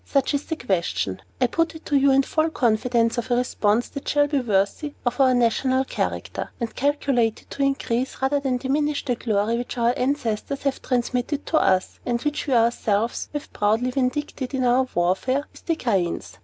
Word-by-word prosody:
Such 275 +1 0
is 285 0 -1
the 320 - -2
question. 175 - -1 0.2
I 255 - +4
put 330 +6 0
it 320 - -11
to 290 - 0
you 280 0 +5
in 270 0 +5
full 315 +3 +1
confidence 235 -3 +1
of 240 - -5
a 245 - +3
response 240 -2 +1
that 280 - -8
shall 290 0 +4
be 290 -1 0
worthy 220 +6 0
of 245 +1 -1
our 260 -1 +5
national 255 +2 +2
character, - - -3
and 235 -2 -3
calculated 275 -5 0
to 280 - -5
increase, 265 -2 0
rather 270 +2 +1
than 265 -3 0
diminish, 290 +3 -1
the 250 - +1
glory 225 0 0
which 245 - -5
our 235 0 +3
ancestors 265 -1 -1
have 275 -1 -1
transmitted 250 +3 -1
to 320 - +1
us, 185 -1 +1
and 240 -1 -1
which 295 0 -2
we 270 - +1
ourselves 230 -1 +1
have 295 0 -6
proudly 220 +5 +1
vindicated 265 +1 -2
in 260 - 0
our 250 +1 +3
warfare 190 +11 +1
with - - -17
the 330 - +2
cranes." 175 - -2
250 Hz, 190 wpm, -23 LUFS, 230-280 Hz, 0.2 s, you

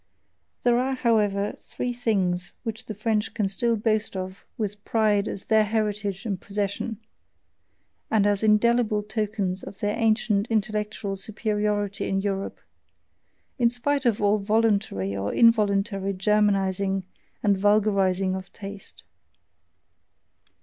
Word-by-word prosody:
There 240 0 +4
are, 265 +1 0
however, 210 -5 +1
three 245 0 -4
things 190 -7 0
which 225 -1 -4
the 215 - -5
French 215 0 -1
can 210 -4 +1
still 230 +4 +1
boast 215 -1 0
of 185 +1 -6
with 205 -2 -4
pride 215 -2 +2
as 195 - -5
their 220 -1 +4
heritage 210 -2 -2
and 195 -5 -3
possession, 205 +2 -3 1.1
and 215 -2 +3
as 205 -1 +2
indelible 220 0 +3
tokens 210 -3 -2
of 195 - -9
their 205 0 0
ancient 220 -2 +2
intellectual 210 -2 -1
superiority 210 -1 -1
in 195 - +1
Europe, 195 0 -2 1.0
in 235 -1 +5
spite 260 +3 0
of 225 -3 +2
all 205 +1 +3
voluntary 205 - +1
or 100 +1 -2
involuntary 200 -3 +3
Germanizing 195 -1 +1 0.4
and 205 -1 +4
vulgarizing 195 -2 +2
of 190 -1 -6
taste. 200 0 -9
210 Hz, 120 wpm, -25 LUFS, 195-220 Hz, 1.1 s, in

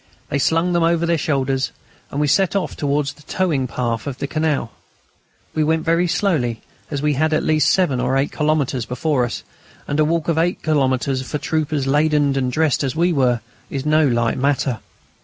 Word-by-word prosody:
They 140 - 0
slung 165 +5 +2
them 170 - +2
over 165 0 +2
their 170 0 +2
shoulders, 135 -2 0 0.4
and 140 - -4
we 150 - +2
set 190 +7 +2
off 195 - -1
towards 145 0 -1
the - - -20
towing 150 -6 -1
path 115 0 -2
of 135 -3 -4
the - - -3
canal. 150 -5 -1 0.8
We 155 - +1
went 160 +1 0
very 170 +2 +2
slowly, 150 - 0 0.3
as 145 -1 -3
we 150 0 +2
had 155 +3 +1
at 155 - +1
least 155 -1 +3
seven 165 -9 +2
or 125 +2 +1
eight 135 +1 0
kilometres 150 -5 0
before 130 0 0
us, 120 - -5 0.4
and 145 - -1
a - - +5
walk 165 +1 0
of 165 -1 +1
eight 175 +2 0
kilometres 135 -3 +1
for 130 +3 -4
troopers 150 -1 -1
laden 145 0 +2
and 130 -2 0
dressed 155 0 +1
as 135 +1 -2
we 175 +2 +2
were 125 -5 +2 0.3
is 135 0 -4
no 155 0 +4
light 120 -2 0
matter. 135 -4 0
145 Hz, 195 wpm, -20 LUFS, 130-160 Hz, 0.8 s, a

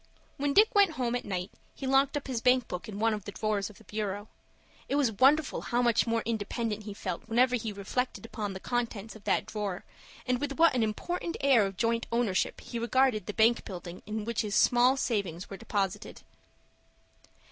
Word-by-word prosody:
When 280 0 -1
Dick 435 +4 +6
went 400 -5 +5
home 245 -4 -1
at 245 - -2
night 185 -2 -3 0.2
he 275 - -6
locked 270 +2 +3
up 290 - -5
his 250 -4 -3
bank 250 0 +3
book 180 +5 -6
in 200 - -6
one 225 +1 +2
of 210 -2 -5
the 205 - -5
drawers 210 0 -1
of 210 - -15
the - - -17
bureau. 205 -1 -4 0.6
It - - +1
was 280 -5 +3
wonderful 270 +7 +3
how 240 +1 0
much 235 -1 +3
more 230 -1 0
independent 220 -1 -2
he 210 - -5
felt 185 -4 -4
whenever 250 +2 +4
he 225 -2 -3
reflected 230 +5 -3
upon 210 -3 -4
the 190 - -6
contents 225 -2 -3
of 215 - -14
that - - +1
drawer, 205 -4 -4 0.4
and 250 -1 0
with 285 -1 -2
what 330 +2 +5
an 250 - +1
important 335 - -2
air 255 -7 +4
of 195 -1 -8
joint 230 +2 0
ownership 230 -5 0
he 235 - -5
regarded 235 -3 +2
the 210 - -3
bank 230 +2 +4
building 180 -2 -8
in 215 0 -3
which 235 -1 -1
his 210 -2 -2
small 250 +2 +5
savings 195 -9 -2
were 195 - -6
deposited. 200 -4 -3
230 Hz, 200 wpm, -29 LUFS, 205-255 Hz, 0.6 s, Dick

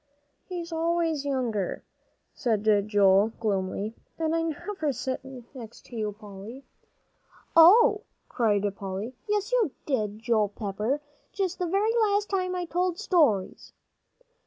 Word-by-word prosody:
"He's 345 -2 -6
always 330 -2 0
younger," 240 -9 -2 0.5
said 220 -4 -1 0.2
Joel, 205 +1 +4
gloomily, 200 0 -1 0.2
"and 320 -1 0
I 330 - +1
never 325 0 -2
sit 260 +1 -3 0.3
next 235 -4 -11
to 245 - -12
you, 215 -2 -2
Polly." 210 +5 -10 0.9
"Oh!" 410 +6 +7 0.3
cried 210 -5 +1
Polly, 200 +5 -5 0.2
"yes, 420 +2 0
you - - +3 0.2
did, 215 -7 -1
Joel 220 -2 +1
Pepper, 210 +7 -2 0.3
just 380 -2 -2
the 360 - 0
very 405 +6 +1
last 415 -3 +2
time 365 -2 0
I 360 -1 -2
told 355 +1 -1
stories." 305 - +1
275 Hz, 125 wpm, -27 LUFS, 210-360 Hz, 0.9 s, Oh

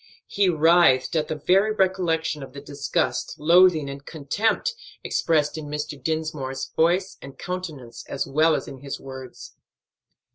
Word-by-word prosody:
He 200 -2 +1
writhed 165 -3 +4
at 155 -1 +1
the 155 - -3
very 190 +8 +2
recollection 180 -6 0
of 135 -1 -9
the 140 - -8
disgust, 145 0 -2
loathing, 165 -1 +5
and 140 0 -7
contempt 185 - -1 0.3
expressed 155 -1 0
in 150 - -7
Mr. 150 -1 -5
Dinsmore's 150 -4 -3
voice 175 +4 +1
and 135 -1 -11
countenance 155 -10 -6
as 135 - -2
well 155 +3 +3
as - - -4
in 135 - -9
his 140 +1 -6
words. 130 -2 -10
155 Hz, 145 wpm, -24 LUFS, 140-175 Hz, 0.3 s, loathing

